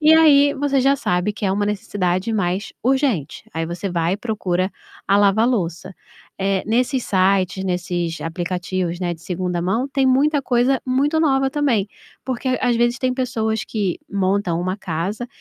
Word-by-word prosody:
E 310 +1 +6
aí 290 -3 +6
você 280 -1 0
já 275 +2 +4
sabe 180 -2 0
que 205 - -6
é - - +1
uma 205 +1 0
necessidade 195 0 -1
mais 195 0 -1
urgente. 260 - 0
Aí 165 0 -1
você 175 +3 -4
vai 170 0 0
e - - -4
procura 190 -5 -1 0.4
a 200 - +5
lava-louça. 200 -4 +1 0.4
Eh, 195 0 0
nesses 250 +3 +1
sites, 190 0 +1
nesses 175 -2 -2
aplicativos, 175 +1 -3
né, 175 -1 -1
de 165 - -17
2ª 180 0 -2
mão, 225 +10 0
tem 270 -1 +1
muita 280 +3 +3
coisa 250 +1 +2
muito 280 +5 +1
nova 270 -4 +2
também, 265 -9 +1 0.4
porque 260 0 -3
às 245 -2 +2
vezes 240 +1 +1
tem 255 0 0
pessoas 220 -4 -1
que 200 -5 -2
montam 190 -3 0
uma 185 +2 -2
casa 195 +5 -3
205 Hz, 165 wpm, -21 LUFS, 180-255 Hz, 0.4 s, E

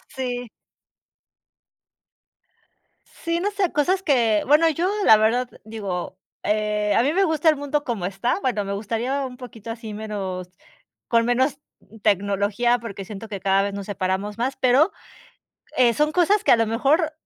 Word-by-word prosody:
Sí. 245 -2 -4 2.6
Sí, 335 0 -3
no 405 +4 -1
sé, 400 -4 0
cosas 365 +6 +1
que, 230 - +2
bueno, 305 +3 +5
yo 335 +4 0 0.2
la 220 - +8
verdad 240 +4 +1
digo, 200 -4 -5 0.3
eh, 210 0 0
a 230 - +4
mí 285 +4 +1
me 390 +3 +3
gusta 320 -2 +2
el 310 - +4
mundo 285 +1 -2
como 230 - -3
está, 195 - -1
bueno, 235 -5 0
me 200 - -3
gustaría 235 +7 -2
un 250 -1 -8
poquito 235 -3 -9
así, 225 -2 -7
menos 195 -4 -5 0.6
con 230 -1 +3
menos 260 +4 +1 0.4
tecnología, 205 +4 +1
porque 200 -4 -7
siento 210 +2 -8
que 200 -2 -5
cada 195 +1 +2
vez 200 0 -3
nos 200 -1 -5
separamos 200 +1 -2
más, 260 +3 -1
pero, 265 +8 +4 0.9
eh, 240 -2 +4
son 300 +3 +1
cosas 370 +4 +3
que - - +5
a - - +7
lo 225 0 +1
mejor 285 +8 +1
235 Hz, 160 wpm, -23 LUFS, 205-285 Hz, 2.6 s, la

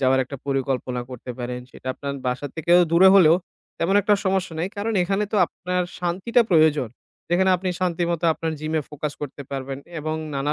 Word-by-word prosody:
যাওয়ার 130 0 +3
একটা 140 +2 -8
পরিকল্পনা 130 -2 -1
করতে 125 0 -8
পারেন। 125 0 -4
সেটা 130 - -15
আপনার 140 -1 -5
বাসার 125 +3 -2
থেকেও 170 +2 +4
দূরে 180 +3 +7
হলেও 170 -4 +7 0.4
তেমন 180 +4 +1
একটা 205 +1 +4
সমস্যা 190 -3 0
নাই, 175 +3 -1
কারণ 210 +3 -2
এখানে 195 +3 0
তো 215 - +1
আপনার 180 0 -2 0.2
শান্তিটা 185 +8 +1
প্রয়োজন। 155 -6 +4 0.4
যেখানে 190 +2 +3
আপনি 185 +1 -3
শান্তিমতো 170 -2 0
আপনার 160 -1 -3
gym-এ 155 0 -1
focus 150 0 -4
করতে 145 0 -6
পারবেন, 135 0 -4 0.2
এবং 155 +1 -2 0.2
নানা 140 +2 0
160 Hz, 175 wpm, -23 LUFS, 135-180 Hz, 0.4 s, দূরে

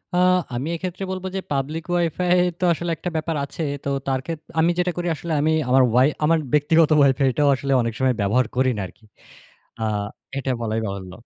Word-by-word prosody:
আ - - +2 0.4
আমি 135 +6 -3
এক্ষেত্রে 185 +2 -5
বলবো 190 0 -4
যে, - - 0
পাবলিক 145 +4 -2
ওয়াইফাই 175 +1 +1 0.2
তো - - -4
আসলে 170 +1 -3
একটা 180 - -4
ব্যাপার 160 0 -1
আছে। 165 - -8 0.2
তো 140 - -2 0.2
তার 135 -1 +1
ক্ষেত্রে, 165 -2 -7
আমি 165 +2 +4
যেটা 180 0 +1
করি, 175 0 -2
আসলে 165 +1 -4
আমি 155 +1 +2 0.2
আমার 130 0 +5
ওয়াই 125 +4 +5 0.2
আমার 165 +2 +4 0.2
ব্যক্তিগত 155 +2 +4
ওয়াইফাইটাও 135 0 +3
আসলে 135 +2 -3
অনেক 115 -1 -2
সময় 130 -1 +3
ব্যবহার 110 +6 +2
করি 130 0 +3
না - - -2
আরকি। 110 - -21 0.8
আ - - 0 0.5
এটা 135 -1 -1
বলাই 110 0 -1
বাহুল্য। 95 -2 -6
145 Hz, 190 wpm, -22 LUFS, 130-165 Hz, 0.8 s, আমার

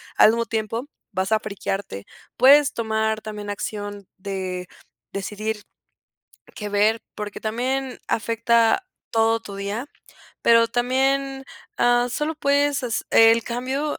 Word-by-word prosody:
al - - +7
mismo 230 +1 +1
tiempo, 225 +2 -3 0.3
vas 190 +3 0
a 215 - +4
frikearte. 195 - -4 0.3
Puedes 280 +3 +7
tomar, 220 -1 0
también 210 -1 -7
acción 205 -1 -5
de 185 -2 -4 0.4
decidir 210 +2 -4 0.9
qué 210 -1 -5
ver, 210 +2 +2
porque, 210 -1 -6
también 255 +4 -2
afecta 230 - +2 0.3
todo 225 0 +2
tu 200 -3 -9
día, 200 +5 -3 0.6
pero 230 0 +5
también, 270 +2 0 0.3
ah, 240 0 +3
solo 300 +5 -2
puedes 285 -1 +1
hace 240 -3 -2
el 225 0 +6
cambio, 260 +5 -2
225 Hz, 120 wpm, -23 LUFS, 210-250 Hz, 0.9 s, al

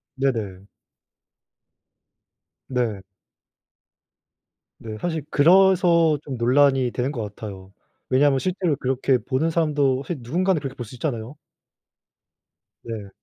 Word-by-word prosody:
네네. 110 -9 -2 2.0
네. 120 -6 -2 1.8
네. 110 -1 -7
사실 160 -4 -3
그래서 170 -1 +4
좀 135 -3 -5
논란이 130 +1 +3
되는 130 +3 -2
것 120 - -4
같아요. 100 -2 -9 0.4
왜냐하면 135 +1 +3
실제로 180 -1 -1
그렇게 130 0 +1
보는 135 +6 -1
사람도 145 -5 +1
사실 170 0 -4
누군가는 170 +8 0
그렇게 135 -2 -6
볼 120 - -6
수 120 - -12
있잖아요. 125 -1 -4 1.5
네. 110 -4 -7
135 Hz, 225 characters per minute, -23 LUFS, 120-155 Hz, 2.0 s, 그래서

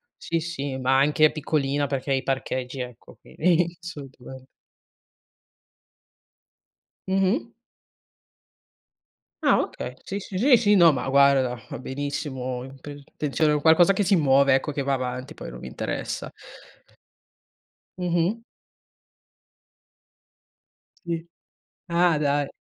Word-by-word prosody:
Sì, 165 - -2
sì, 145 -5 -4
ma 130 +1 +2
anche 150 +2 +4
piccolina 145 -2 -1
perché 135 0 -2
i 135 - +1
parcheggi 130 -1 -3
ecco 125 -1 -10
quindi 170 +1 0
assolutamen 135 -5 -10 2.6
Mh-mh. 195 - +1 1.9
Ah, - - +5
okay. - - -6
Sì, 200 - -4
sì, 190 -1 -7
sì, 250 +5 +6
sì. 210 -3 +3
No, 170 -4 +7
ma 135 -1 -3
guarda, 135 -3 +3
va - - -6
benissimo. 130 -2 -4
Int 135 0 -13
intenzione 150 +1 -1
qualcosa 165 +4 +5
che 195 +1 +1
si 195 +1 +3
muove 140 -3 +4
ecco, 135 +3 +1
che 140 -1 -3
va 140 0 0
avanti, 130 +2 -4
poi - - -9
non - - -10
mi - - -10
interessa. - - -4 1.7
Mh-mh. 180 +4 0 2.6
Sì. 165 -1 -3 0.6
Ah, 170 -1 +3
dai. 145 -1 +1
145 Hz, 110 wpm, -24 LUFS, 135-170 Hz, 2.6 s, No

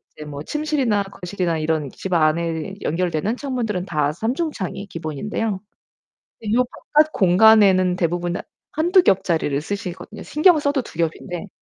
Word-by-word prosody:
이제 150 - -9
뭐 145 -1 -7
침실이나 280 - 0
거실이나 180 -3 -3
이런 155 -3 -1
집 190 -2 -5
안에 165 +3 +1
연결되는 175 +6 -1
창문들은 230 -9 -2
다 150 -5 0
3 225 +8 -1
중창이 215 - -4
기본인데요. 185 +6 -3 0.9
요 250 +1 +3 0.3
바깥 310 +1 +5
공간에는 190 -1 +5
대부분 175 0 -1 0.4
1-2 350 +4 +4
겹짜리를 170 -7 +1
쓰시거든요. 200 +3 -6
신경 310 +2 +4
써도 285 -2 0
2 - - -13
겹인데 170 +3 -3
190 Hz, 305 characters per minute, -21 LUFS, 165-225 Hz, 0.9 s, 바깥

